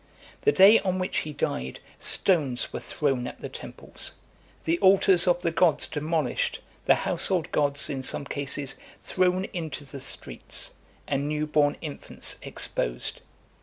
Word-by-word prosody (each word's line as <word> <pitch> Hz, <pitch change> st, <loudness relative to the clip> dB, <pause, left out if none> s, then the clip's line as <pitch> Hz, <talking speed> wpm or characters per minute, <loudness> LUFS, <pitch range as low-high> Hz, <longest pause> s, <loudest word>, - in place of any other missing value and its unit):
The 435 Hz, -, +4 dB
day 205 Hz, -, +7 dB
on 185 Hz, -1 st, -1 dB
which 185 Hz, 0 st, -1 dB
he 155 Hz, -, -5 dB
died, 65 Hz, -, -3 dB, 0.2 s
stones 145 Hz, -10 st, +2 dB
were -, -, -3 dB
thrown 135 Hz, -5 st, -1 dB
at -, -, -9 dB
the -, -, -6 dB
temples, -, -, -8 dB, 0.5 s
the 165 Hz, +1 st, 0 dB
altars 190 Hz, -2 st, +5 dB
of 175 Hz, 0 st, +2 dB
the 170 Hz, -, +1 dB
gods 165 Hz, -2 st, +3 dB
demolished, 155 Hz, -3 st, -1 dB, 0.3 s
the -, -, +6 dB
household 180 Hz, -4 st, 0 dB
gods, 145 Hz, -1 st, +2 dB
in 135 Hz, -2 st, -3 dB
some 135 Hz, -, 0 dB
cases, 140 Hz, 0 st, -1 dB, 0.3 s
thrown 185 Hz, 0 st, +1 dB
into 160 Hz, -4 st, -4 dB
the 135 Hz, 0 st, -8 dB
streets, 135 Hz, -, -3 dB, 0.3 s
and 140 Hz, +1 st, -1 dB
new 150 Hz, 0 st, -1 dB
born 150 Hz, -1 st, +2 dB
infants 150 Hz, -3 st, -1 dB
exposed. -, -, -3 dB
150 Hz, 145 wpm, -26 LUFS, 140-180 Hz, 0.5 s, day